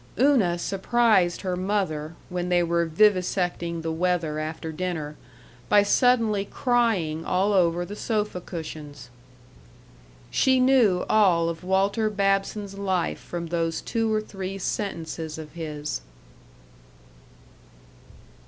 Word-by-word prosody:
Una 240 -11 +3
surprised 195 -1 +2
her 185 -2 -2
mother, 180 -5 -2
when 180 0 -3
they 175 -1 +3
were 170 0 +1
vivisecting 175 -2 +1
the 165 - -2
weather 165 -2 0
after 160 +1 -5
dinner, 160 -3 -4 0.5
by 205 -1 +6
suddenly 225 -2 +3
crying 205 - 0
all 190 +4 +1
over 175 -2 +2
the 205 - -7
sofa 210 -4 -2
cushions. 155 -6 -8 1.2
She 260 -1 +3
knew 250 -8 +4
all 180 -6 +3
of 165 +1 -6
Walter 195 +4 +1
Babson's 195 0 -1
life 190 -3 -1
from 170 -1 -6
those 165 -1 -1
two 225 -1 -1
or 215 0 +1
three 195 -2 -6
sentences 165 -5 -4
of 155 -2 -8
his. 150 - -5
180 Hz, 115 wpm, -25 LUFS, 165-205 Hz, 1.2 s, by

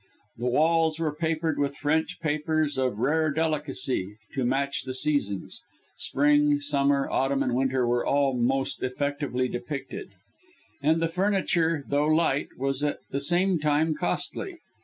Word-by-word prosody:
The 120 +2 -2
walls 160 +4 +2
were 155 -3 0
papered 160 0 -1
with 140 0 -1
French 155 +2 0
papers 155 -1 0
of 130 -5 0
rare 155 +6 +2
delicacy 145 -9 -1 0.2
to 135 -2 -1
match 135 +3 0
the 130 -1 -5
seasons; 130 -9 -1 0.3
(spring, 145 +1 +2
summer, 140 -1 +1
autumn 135 +1 +1
and 125 -2 -1
winter 130 0 +1
were 120 0 +1
all 140 -2 +2
most 130 +3 0
effectively 140 -1 -1
depicted), 125 +4 -5 0.7
and 160 +3 +2
the - - +3
furniture 170 -4 +1
though 145 +1 +1
light, 155 -3 +2
was 135 +1 -1
at 145 - 0
the 140 - -1
same 175 +3 +2
time 150 +1 +2
costly. 260 - -3
145 Hz, 140 wpm, -26 LUFS, 135-160 Hz, 0.7 s, the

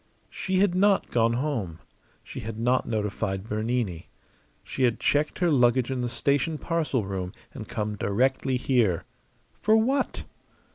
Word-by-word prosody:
She 190 0 -2
had 195 -1 +3
not 195 +2 +3
gone 115 -1 +3
home. 120 - -2 0.5
She - - -8
had 110 0 -6
not 125 +3 +1
notified 105 -3 -2
Bernini. 110 -5 -2 0.5
She - - -6
had 120 -3 +2
checked 150 +1 +1
her 175 -2 +2
luggage 125 -1 +3
in 130 -1 -1
the 120 - -1
station 145 +5 0
parcel 155 - -1
room 95 -2 -4 0.2
and - - -8
come 105 0 -3
directly 130 +6 +1
here. 120 -9 +1 0.6
For 215 +1 +4
what? 265 +5 0
125 Hz, 145 wpm, -26 LUFS, 105-150 Hz, 0.6 s, For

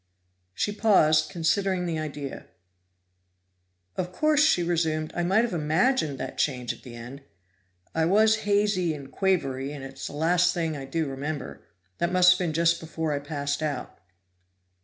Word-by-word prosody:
She 205 - 0
paused, 155 -8 +3
considering 185 +2 0
the 165 -2 -2
idea. 145 -3 -6 1.5
"Of 180 -1 -3
course," 300 +8 +3
she 240 - +3
resumed, 160 -2 -1
"I 175 - 0
might 195 +6 +3
have 240 - -2
imagined 160 - +1
that - - -6
change 125 -4 0
at - - -16
the 120 -2 -11
end. 120 +4 -9 0.7
I 160 0 +1
was 215 +5 +4
hazy 205 -5 +1
and 140 -2 -10
quavery, 140 -8 0
and 145 -2 -8
it's 135 0 -7
the - - -8
last 170 +5 +2
thing 165 -3 -1
I 135 -2 -6
do 160 +4 -2
remember; 140 +1 -5 0.4
that 170 0 0
must 180 0 +6
have 185 - +2
been 175 -3 -1
just 170 +1 +2
before 160 -1 -3
I 145 - -1
passed 145 0 -3
out." 145 - -4
160 Hz, 160 wpm, -26 LUFS, 145-185 Hz, 1.5 s, must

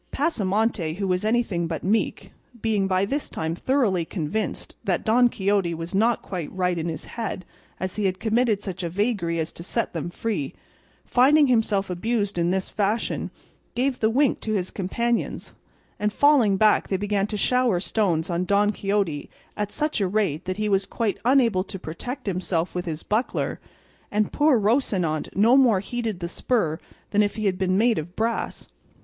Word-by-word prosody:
Pasamonte, 210 - 0
who 195 +1 -2
was 180 +1 0
anything 215 -6 +1
but 165 -1 -4
meek 215 +4 0 0.3
(being 210 -3 +1
by 190 +1 +2
this 280 +8 -2
time 160 0 -3
thoroughly 205 -4 +1
convinced 180 +5 -3
that - - 0
Don 240 +2 +5
Quixote 195 -5 0
was 165 +2 -6
not 225 +4 +2
quite 175 -5 -5
right 180 -2 0
in 165 - -2
his 160 -2 -6
head 220 -5 -5 0.3
as 185 +2 -4
he 210 - 0
had 185 -1 0
committed 225 -2 +1
such 190 -2 -5
a 170 - -2
vagary 190 -3 0
as 160 -1 -2
to - - -10
set 225 +6 -2
them 165 0 -3
free), 175 -7 -3 0.5
finding 285 +4 +5
himself 225 -6 +2
abused 205 0 -1
in 170 0 +2
this 190 +1 0
fashion, 210 +2 -1 0.5
gave 255 +2 0
the 220 - +3
wink 265 +3 +2
to 215 - -3
his 185 -3 -1
companions, 235 +5 -2 0.5
and 210 0 +1
falling 245 -6 +4
back 215 +1 +4
they 190 - 0
began 205 0 0
to 210 - -3
shower 250 -4 +2
stones 175 -3 0
on 170 +1 0
Don 200 +2 +3
Quixote 195 -8 -1 0.3
at 210 -1 -3
such 300 -7 -1
a 195 - +2
rate 190 -5 0
that 185 +1 -3
he 215 0 0
was 195 -1 +1
quite 225 -4 -1
unable 235 -7 +3
to 195 - -6
protect 245 - -6
himself 185 -3 -1
with 180 0 -3
his 160 -2 -4
buckler, 220 +4 -1 0.5
and 210 0 0
poor 290 -5 +4
Rocinante 200 - +1
no 225 +6 +5
more 245 -8 +5
heeded 220 -2 -4
the 170 - -2
spur 170 -5 0 0.3
than 210 - +4
if 205 -1 0
he 215 -1 -3
had 190 -2 +1
been 185 0 +1
made 230 -1 +3
of 170 +4 -8
brass. 225 +1 -2
205 Hz, 180 wpm, -24 LUFS, 180-230 Hz, 0.5 s, Don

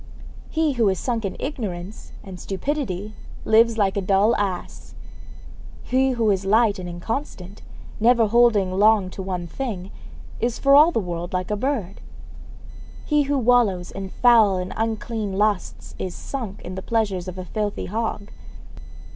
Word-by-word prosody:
He 320 -2 +1
who 230 -5 +2
is 190 - 0
sunk 230 -2 -2
in 195 - -3
ignorance 210 -8 -6
and 185 -2 -9
stupidity 210 -2 -3 0.3
lives 225 +1 +4
like 195 -3 +1
a 200 - 0
dull 195 +4 +3
ass. 195 -3 -4 0.9
He 260 +1 +1
who 225 -3 +2
is 195 -1 0
light 210 +1 +3
and 180 -1 -6
inconstant, 195 +1 -5 0.4
never 235 +1 +4
holding 220 -4 +3
long 200 0 +3
to 195 - -7
one 185 -2 -4
thing, 195 -2 -5 0.5
is 235 0 -1
for 275 0 +3
all 300 +4 +7
the 230 - 0
world 175 -2 -5
like 185 +2 -2
a - - +1
bird. 225 -5 -3 1.0
He 300 -1 +2
who 285 - +2
wallows 230 -8 +2
in 195 -1 -6
foul 225 -4 +4
and 180 0 -4
unclean 220 -2 -3
lusts 205 -1 -1
is 185 -2 -4
sunk 225 -7 -6
in 180 - -7
the 190 - -5
pleasures 200 -5 -1
of 185 0 -6
a 185 - -6
filthy 210 +2 -3
hog. 215 0 -3
210 Hz, 155 wpm, -23 LUFS, 190-235 Hz, 1.0 s, all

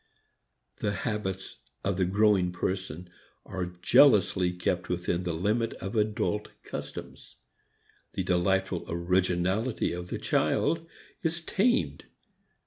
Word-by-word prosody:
The 105 -1 -1
habits 100 -4 -3 0.3
of 100 -2 0
the 95 - +2
growing 100 -1 +3
person 90 -2 -3 0.4
are 95 -2 -3 0.2
jealously 95 -8 +5
kept 90 +1 -2
within 90 0 -1
the 85 - -1
limit 105 +7 0
of 95 +3 -6
adult 105 -1 0
customs. - - -8 0.8
The 95 - -1
delightful 90 +1 +1
originality 90 +6 +1
of 90 0 -5
the - - -3
child 165 0 +1 0.3
is 165 +1 -1
tamed. 240 +9 +1
95 Hz, 110 wpm, -29 LUFS, 90-105 Hz, 0.8 s, jealously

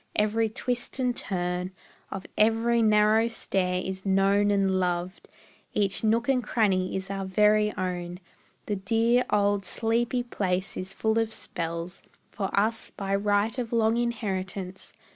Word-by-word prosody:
Every 215 +1 +2
twist 245 +4 -2
and 250 -2 0
turn 180 -2 -2 0.4
Of 190 -1 -6
every 225 +2 +3
narrow 215 +1 +4
stair 185 -5 -1
is 190 0 -5
known 195 +1 +3
and 195 -2 +2
loved; 180 0 -2 0.5
Each 200 0 0
nook 230 +2 +2
and 260 -2 +2
cranny 195 -5 +1
is 190 +1 -4
our 195 0 -3
very 210 +2 +3
own; 180 -1 -3 0.5
The 205 - -2
dear, 230 +5 +2
old, 205 -1 +2
sleepy 235 +4 0
place 190 -5 -2
is 185 +1 -5
full 220 +2 0
of 225 -1 0
spells 170 -2 -4 0.3
For 195 -3 -3
us, 220 +3 0
by 195 -1 -4
right 205 +2 +1
of 235 -2 -3
long 225 -1 +3
inheritance. 195 -5 -3
205 Hz, 145 wpm, -27 LUFS, 190-225 Hz, 0.5 s, narrow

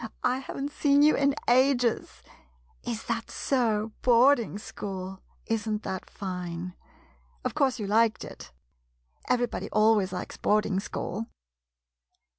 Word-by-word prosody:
I 250 +1 +2
haven't 275 +1 -5
seen 285 -1 +3
you 305 - +6
in 280 0 +2
ages. 250 -1 +2 0.6
Is 235 -2 -4
that 230 0 -3
so 225 -5 0
— - - -36
boarding 240 -2 +4
school? 190 -2 -6 0.2
Isn't 220 -1 -1
that 190 -1 -5
fine? 180 -2 -5 0.7
Of - - -1
course, 270 -4 +2
you 215 - -4
liked 220 +2 +2
it? - - -11 0.8
Everybody 245 -1 0
always 215 -3 +3
likes 185 - -6
boarding 210 -2 +1
school 210 +2 -4
225 Hz, 120 wpm, -28 LUFS, 205-255 Hz, 0.8 s, you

